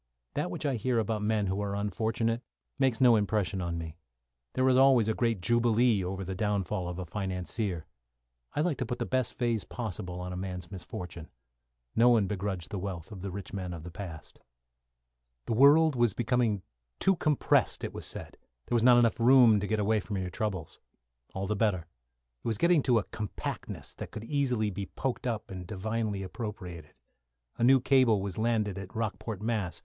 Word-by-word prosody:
That -, -, -1 dB
which 90 Hz, -, -5 dB
I 135 Hz, -4 st, +1 dB
hear 125 Hz, +2 st, 0 dB
about 110 Hz, -1 st, 0 dB
men 105 Hz, -1 st, +1 dB
who 95 Hz, +1 st, -1 dB
are 100 Hz, -1 st, -2 dB
unfortunate 110 Hz, +3 st, -1 dB, 0.4 s
makes 130 Hz, -4 st, +2 dB
no 120 Hz, -2 st, +7 dB
impression 100 Hz, -2 st, 0 dB
on 85 Hz, -1 st, -2 dB
me. 80 Hz, 0 st, -6 dB, 0.6 s
There 130 Hz, 0 st, +2 dB
is 130 Hz, -, +5 dB
always 130 Hz, -4 st, +6 dB
a 110 Hz, -, +2 dB
great 115 Hz, -4 st, 0 dB
jubilee 120 Hz, -1 st, +3 dB
over 95 Hz, +2 st, -3 dB
the 95 Hz, +1 st, -4 dB
downfall 100 Hz, -1 st, -1 dB
of 90 Hz, -, -5 dB
a 90 Hz, -, -4 dB
financier. 95 Hz, 0 st, -3 dB, 0.7 s
I 150 Hz, -, +2 dB
like 155 Hz, -3 st, 0 dB
to 130 Hz, -, 0 dB
put 120 Hz, -, -3 dB
the -, -, -2 dB
best 130 Hz, -2 st, -1 dB
phase 115 Hz, -5 st, 0 dB
possible 95 Hz, -4 st, -5 dB
upon 90 Hz, 0 st, -5 dB
a -, -, -5 dB
man's 90 Hz, -1 st, -5 dB
misfortune. 90 Hz, -3 st, -7 dB, 0.7 s
No 120 Hz, +2 st, +6 dB
one 115 Hz, -4 st, +4 dB
begrudged 95 Hz, -4 st, -3 dB
the 100 Hz, -, -3 dB
wealth 90 Hz, -4 st, -5 dB
of 100 Hz, -3 st, -8 dB
the 100 Hz, -, -4 dB
rich 95 Hz, +1 st, -7 dB
men 90 Hz, -3 st, -4 dB
of 80 Hz, -, -9 dB
the 90 Hz, -, -8 dB
past. 85 Hz, -4 st, -9 dB, 1.1 s
The -, -, -1 dB
world 145 Hz, +5 st, +6 dB
was 120 Hz, -3 st, +2 dB
becoming 120 Hz, -4 st, +1 dB, 0.3 s
too 190 Hz, -, +3 dB
compressed, 150 Hz, -3 st, +2 dB
it -, -, -4 dB
was -, -, -4 dB
said; -, -, -5 dB, 0.3 s
there -, -, -1 dB
was 115 Hz, -, +3 dB
not 125 Hz, +1 st, +7 dB, 0.2 s
room 125 Hz, 0 st, +7 dB
enough 105 Hz, -2 st, +3 dB
to 105 Hz, -, -2 dB
get 110 Hz, +1 st, 0 dB
away 110 Hz, +1 st, +2 dB
from 100 Hz, 0 st, -4 dB
your 90 Hz, -1 st, -3 dB
troubles. 95 Hz, -7 st, -3 dB, 0.6 s
All 95 Hz, 0 st, -2 dB
the 105 Hz, +2 st, -1 dB
better. 100 Hz, -5 st, +1 dB, 0.6 s
It -, -, -5 dB
was 110 Hz, -2 st, 0 dB
getting 170 Hz, +1 st, +4 dB
to 125 Hz, -3 st, +3 dB
a 110 Hz, -, +2 dB
compactness 105 Hz, -2 st, -6 dB
that -, -, -7 dB
could 110 Hz, -, -7 dB
be 145 Hz, -, -5 dB
easily 125 Hz, -7 st, +1 dB, 0.2 s
poked 130 Hz, -1 st, -2 dB
up 115 Hz, -5 st, -3 dB
and 90 Hz, -2 st, -7 dB
divinely 105 Hz, 0 st, -2 dB
appropriated. 90 Hz, -6 st, -7 dB, 0.6 s
A -, -, +1 dB
new 130 Hz, +2 st, +7 dB
cable 130 Hz, -5 st, +4 dB
was 100 Hz, +1 st, -4 dB
landed 110 Hz, -4 st, 0 dB
at 95 Hz, -1 st, -9 dB
Rockport, 110 Hz, -2 st, -3 dB
Mass. 110 Hz, -6 st, -1 dB
105 Hz, 195 wpm, -30 LUFS, 95-120 Hz, 1.1 s, no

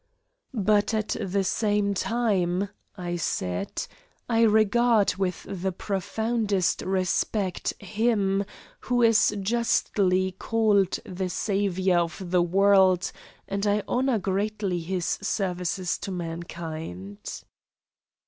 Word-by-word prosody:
"But 210 Hz, +1 st, +3 dB
at 215 Hz, 0 st, -1 dB
the 195 Hz, +1 st, 0 dB
same 205 Hz, 0 st, +1 dB
time," 200 Hz, -4 st, 0 dB, 0.3 s
I 175 Hz, -1 st, -3 dB
said, 90 Hz, -, -2 dB, 0.4 s
"I 230 Hz, -1 st, +2 dB
regard 220 Hz, 0 st, +4 dB
with 190 Hz, -2 st, -2 dB
the 190 Hz, 0 st, -2 dB
profoundest 205 Hz, +1 st, -1 dB
respect 185 Hz, +1 st, -1 dB
Him 205 Hz, -1 st, +1 dB, 0.4 s
who 245 Hz, -1 st, +1 dB
is 225 Hz, -2 st, +4 dB
justly 195 Hz, -3 st, +1 dB
called 205 Hz, -1 st, +2 dB
the 185 Hz, 0 st, -3 dB
Saviour 190 Hz, -2 st, +1 dB
of 175 Hz, +1 st, -3 dB
the 180 Hz, -1 st, +4 dB
world, 190 Hz, 0 st, +4 dB, 0.4 s
and 200 Hz, +1 st, -1 dB
I 205 Hz, 0 st, +2 dB
honour 255 Hz, -1 st, +1 dB
greatly 200 Hz, -1 st, -1 dB
His 175 Hz, +1 st, -3 dB, 0.2 s
services 185 Hz, -3 st, -1 dB
to -, -, -5 dB
mankind. 165 Hz, -, -6 dB
195 Hz, 100 wpm, -26 LUFS, 180-215 Hz, 0.4 s, regard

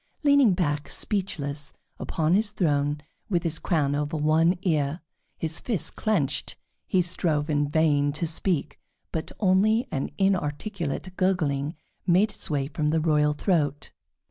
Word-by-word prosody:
Leaning 280 Hz, -9 st, +5 dB
back, 150 Hz, -4 st, -1 dB
speechless, 150 Hz, -8 st, -2 dB, 0.3 s
upon 160 Hz, 0 st, 0 dB
his 205 Hz, +2 st, +2 dB
throne, 145 Hz, -6 st, 0 dB, 0.3 s
with 175 Hz, -4 st, +1 dB
his 165 Hz, -2 st, 0 dB
crown 150 Hz, -6 st, +1 dB
over 150 Hz, +2 st, -1 dB
one 160 Hz, +4 st, +3 dB
ear, 155 Hz, -3 st, 0 dB, 0.4 s
his 160 Hz, 0 st, -2 dB
fists 215 Hz, -, -2 dB
clenched, 145 Hz, -11 st, -1 dB, 0.3 s
he 185 Hz, -1 st, +2 dB
strove 160 Hz, -3 st, 0 dB
in 145 Hz, -1 st, +1 dB
vain 145 Hz, -2 st, +2 dB
to 155 Hz, +4 st, -3 dB
speak, 160 Hz, -2 st, 0 dB, 0.3 s
but 160 Hz, 0 st, -4 dB
only 215 Hz, +4 st, +3 dB
an 135 Hz, -3 st, -2 dB
inarticulate 185 Hz, -1 st, -1 dB
gurgling 155 Hz, -6 st, 0 dB, 0.3 s
made 190 Hz, +5 st, +4 dB
its -, -, -5 dB
way 140 Hz, -3 st, 0 dB
from 150 Hz, +1 st, -2 dB
the 160 Hz, +2 st, +2 dB
royal 150 Hz, -2 st, +2 dB
throat. 145 Hz, -3 st, 0 dB
160 Hz, 140 wpm, -26 LUFS, 145-185 Hz, 0.4 s, Leaning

